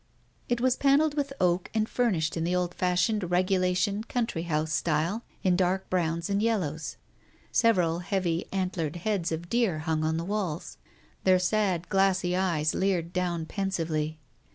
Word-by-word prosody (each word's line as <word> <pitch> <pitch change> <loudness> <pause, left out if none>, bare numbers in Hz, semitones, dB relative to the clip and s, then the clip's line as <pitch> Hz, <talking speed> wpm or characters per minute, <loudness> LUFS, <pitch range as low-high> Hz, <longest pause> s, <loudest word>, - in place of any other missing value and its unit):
It 240 -1 +1
was 255 +1 +2
panelled 285 +2 +3
with 285 -2 -1
oak 180 0 +1
and 220 0 +2
furnished 185 -12 0
in 165 - -1
the 175 +2 0
old 180 -1 0
fashioned 180 +2 +1
regulation 185 +3 +1
country 230 -7 -2
house 155 0 0
style 170 +9 0 0.2
in 185 -3 +3
dark 185 +1 0
browns 170 -2 0
and 200 0 0
yellows. 180 -9 -1 0.5
Several 180 -8 +3
heavy 180 -2 -1
antlered 180 -5 -2
heads 180 -1 -1
of 165 +1 -4
deer 230 -6 +1
hung 160 -1 -1
on 160 +1 0
the 165 - -3
walls. 175 - -3 0.5
Their 185 -1 +5
sad, 185 -2 0
glassy 190 -2 +2
eyes 165 -5 +1
leered 180 -3 0
down 175 -3 -1
pen 195 +3 -2
sively. 160 -4 -2
180 Hz, 155 wpm, -28 LUFS, 165-200 Hz, 0.5 s, Their